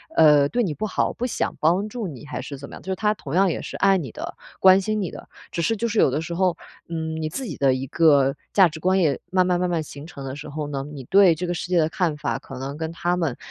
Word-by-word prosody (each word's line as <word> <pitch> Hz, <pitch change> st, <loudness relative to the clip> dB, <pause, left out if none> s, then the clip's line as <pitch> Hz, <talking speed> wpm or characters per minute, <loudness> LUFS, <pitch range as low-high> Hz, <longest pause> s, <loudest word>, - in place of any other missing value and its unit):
呃， 150 Hz, -2 st, +6 dB
对 245 Hz, -, +1 dB
你 175 Hz, -8 st, -1 dB
不 215 Hz, -, -3 dB
好， -, -, 0 dB
不 250 Hz, -, -2 dB
想 -, -, -2 dB
帮 180 Hz, +7 st, +2 dB
助 225 Hz, -2 st, -4 dB
你 150 Hz, -3 st, -9 dB
还 145 Hz, -, -5 dB
是 140 Hz, -, -7 dB
怎 140 Hz, +1 st, -9 dB
么 -, -, -12 dB
样， -, -, -11 dB
就 190 Hz, -, -5 dB
是 -, -, 0 dB
他 210 Hz, +2 st, +1 dB
同 150 Hz, -7 st, -6 dB
样 190 Hz, 0 st, +4 dB
也 -, -, -3 dB
是 -, -, -6 dB
爱 195 Hz, -1 st, +4 dB
你 135 Hz, -8 st, -6 dB
的、 -, -, -7 dB, 0.2 s
关 190 Hz, +1 st, +7 dB
心 215 Hz, +2 st, -1 dB
你 185 Hz, -, -3 dB
的， -, -, -11 dB, 0.2 s
只 170 Hz, -, -2 dB
是 225 Hz, +7 st, +1 dB
就 235 Hz, +3 st, -1 dB
是 220 Hz, -1 st, 0 dB
有 -, -, +5 dB
的 150 Hz, -, -1 dB
时 165 Hz, +1 st, -5 dB
候， 180 Hz, -1 st, +1 dB, 0.3 s
嗯， 160 Hz, -1 st, -3 dB
你 155 Hz, -, -2 dB
自 265 Hz, -, -5 dB
己 170 Hz, -, -5 dB
的 135 Hz, -2 st, +3 dB
一 130 Hz, +1 st, -3 dB
个 140 Hz, -3 st, +4 dB, 0.2 s
价 190 Hz, -3 st, +7 dB
值 160 Hz, 0 st, -9 dB
观 185 Hz, +3 st, +2 dB
也 150 Hz, -6 st, +2 dB
慢 185 Hz, -1 st, +3 dB
慢 180 Hz, -1 st, +1 dB
慢 180 Hz, 0 st, 0 dB
慢 170 Hz, -2 st, 0 dB
形 145 Hz, 0 st, -10 dB
成 140 Hz, -5 st, -9 dB
的 130 Hz, 0 st, -5 dB
时 150 Hz, +1 st, -8 dB
候 150 Hz, 0 st, -4 dB
呢， 140 Hz, -2 st, -3 dB
你 140 Hz, -3 st, -8 dB
对 190 Hz, -1 st, +5 dB
这 175 Hz, +3 st, -4 dB
个 175 Hz, -, -1 dB
世 175 Hz, -, -4 dB
界 180 Hz, -, +2 dB
的 155 Hz, -, +3 dB
看 160 Hz, -3 st, -1 dB
法 150 Hz, -, -2 dB
可 135 Hz, -, -10 dB
能 140 Hz, +2 st, -5 dB
跟 160 Hz, 0 st, -3 dB
他 175 Hz, +1 st, -1 dB
们， 160 Hz, -8 st, -1 dB
165 Hz, 320 characters per minute, -23 LUFS, 145-190 Hz, 0.3 s, 关